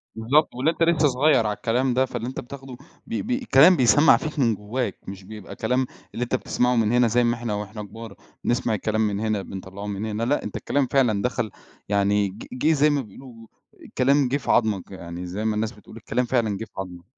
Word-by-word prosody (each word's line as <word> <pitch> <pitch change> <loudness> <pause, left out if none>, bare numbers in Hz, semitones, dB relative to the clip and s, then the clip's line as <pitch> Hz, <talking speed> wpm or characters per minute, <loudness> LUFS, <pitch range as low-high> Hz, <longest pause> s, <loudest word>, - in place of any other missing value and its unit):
بالضبط، 130 +8 +2
واللي 135 +6 +2
أنت 165 - -1
لسه 165 -3 +4
صغيّر 135 -3 +3
عالكلام 120 +5 0
ده 130 +2 +3
فاللي 120 -2 -5
أنت 130 - -5
بتاخده 135 0 -9 0.3
ب 230 - -7 0.2
ب 255 +1 -2
كلام 165 +7 +8
بيسمّع 135 +5 +6
فيك 155 -1 -5
من 115 -5 +3
جوّاك، 105 +1 -3
مش 95 0 -8
بيبقى 105 +1 -10
كلام 125 +4 0 0.3
اللي 120 - -2
أنت 120 - -1
بتسمَعه 125 0 0
من 115 -2 +2
هنا 120 0 +4
زي 120 +2 +2
ما 120 0 +2
إحنا 115 -2 -4
وإحنا 105 +1 -5
كبار 110 +1 -10 0.3
بنسمَع 120 -1 0
الكلام 110 +1 -1
من 105 -2 0
هنا 110 -2 -1
بنطلّعه 95 +1 -8
من 100 +1 -3
هنا، 110 +1 -3
لأ 140 +5 +1
أنت - - -6
الكلام 140 -2 0
فعلًا 120 -7 +2
دخَل 120 -2 -2 0.4
يعني 100 0 +2
ج 100 +4 -10
جِه 130 +5 +2
زي 150 0 +4
ما 145 -1 +1
بيقولوا 115 0 -13 0.5
كلام 140 +1 +3
جِه 135 +3 0
في 140 - -2
عضمك 105 -6 +1
يعني 90 -1 -7
زي 95 +5 -4
ما 110 -1 +1
الناس 110 +1 -1
بتقول، 110 0 -14
الكلام 120 +2 -1
فعلًا 115 -5 0
جِه 110 - -5
في - - -30
عضمك. 90 -2 -6
115 Hz, 215 wpm, -24 LUFS, 105-130 Hz, 0.5 s, كلام